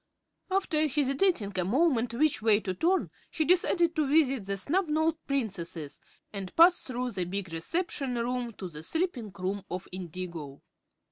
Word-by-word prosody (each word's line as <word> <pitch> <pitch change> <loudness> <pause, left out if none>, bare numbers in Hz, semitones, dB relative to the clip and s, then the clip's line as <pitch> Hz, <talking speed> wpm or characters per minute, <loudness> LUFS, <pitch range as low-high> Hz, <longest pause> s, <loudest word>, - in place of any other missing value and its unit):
After 350 -5 +1
hesitating 275 - +1
a - - +2
moment 245 - +2
which 285 -4 +2
way 215 -2 +4
to 185 - -2
turn 360 - +1 0.2
she 315 - -1
decided 345 -1 +3
to 305 -2 +1
visit 270 -7 +2
the 200 0 -1
Snubnosed 320 - +1
Princesses 180 - -3 0.3
and 195 -2 -6
passed 345 +2 +6
through 250 -1 -2
the 185 -4 -2
big 190 -1 -4
reception 275 - -2
room 240 0 -2
to 190 - -7
the 150 -3 -9
sleeping 260 - -2
room 190 +2 -2
of 180 0 -5
Indigo. 170 -5 -7
245 Hz, 150 wpm, -29 LUFS, 185-315 Hz, 0.3 s, passed